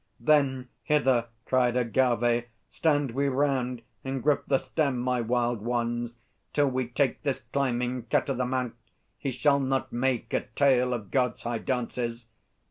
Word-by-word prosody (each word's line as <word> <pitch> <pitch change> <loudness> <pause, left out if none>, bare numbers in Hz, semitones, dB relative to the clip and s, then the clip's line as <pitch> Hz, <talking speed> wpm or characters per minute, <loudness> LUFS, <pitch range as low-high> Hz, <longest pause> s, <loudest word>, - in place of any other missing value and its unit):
Then, 135 -4 +2
"Hither," 130 -5 +2 0.2
cried 125 -2 +2
Agâvê; 120 -1 +2 0.3
"stand 145 -5 +1
we 140 +4 0
round 130 -3 0 0.2
And 135 -1 -3
grip 150 -1 +2
the 135 - +4
stem, 140 -2 -1
my 125 0 0
Wild 120 -1 0
Ones, 120 0 -2 0.4
till 145 -2 +3
we 130 -1 -1
take 130 +3 0
This 140 -3 -1
climbing 125 -3 0
cat - - +1
o' 135 - 0
the 125 -1 -1
mount! 125 -2 -1 0.5
He 140 - -2
shall 140 +2 +2
not 135 -1 -1
make 120 -1 -1
A - - 0
tale 125 -3 +3
of 105 -5 -7
God's 125 -2 0
high 120 -1 -2
dances!" 120 -2 -3
125 Hz, 155 wpm, -28 LUFS, 120-135 Hz, 0.5 s, the